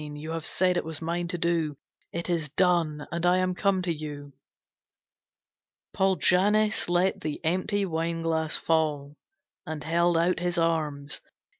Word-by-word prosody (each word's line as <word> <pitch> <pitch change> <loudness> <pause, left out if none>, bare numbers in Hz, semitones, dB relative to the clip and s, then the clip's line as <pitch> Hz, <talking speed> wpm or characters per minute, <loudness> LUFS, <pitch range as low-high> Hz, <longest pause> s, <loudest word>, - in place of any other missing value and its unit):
You 150 +1 -7
have 165 -1 -3
said 180 -1 +2
it - - 0
was 160 -1 -6
mine 170 +1 -2
to 175 +1 -3
do. 165 -4 0 0.3
It 170 0 -3
is 165 -4 -1
done, 165 -2 +1
and 170 0 -3
I 180 +1 +4
am 185 0 +1
come 190 0 +1
to 175 -2 0
you!" 145 -2 -7 1.6
Paul 190 0 +2
Jannes 205 +5 +2
let 180 +2 +2
the 155 -2 -3
empty 185 +5 0
wine 165 -1 -2
glass 160 -1 0
fall, 150 -3 0 0.5
And 155 -1 -5
held 170 +1 +2
out 175 +2 +2
his 175 0 -1
arms. 155 -4 -1
165 Hz, 155 wpm, -27 LUFS, 155-180 Hz, 1.6 s, I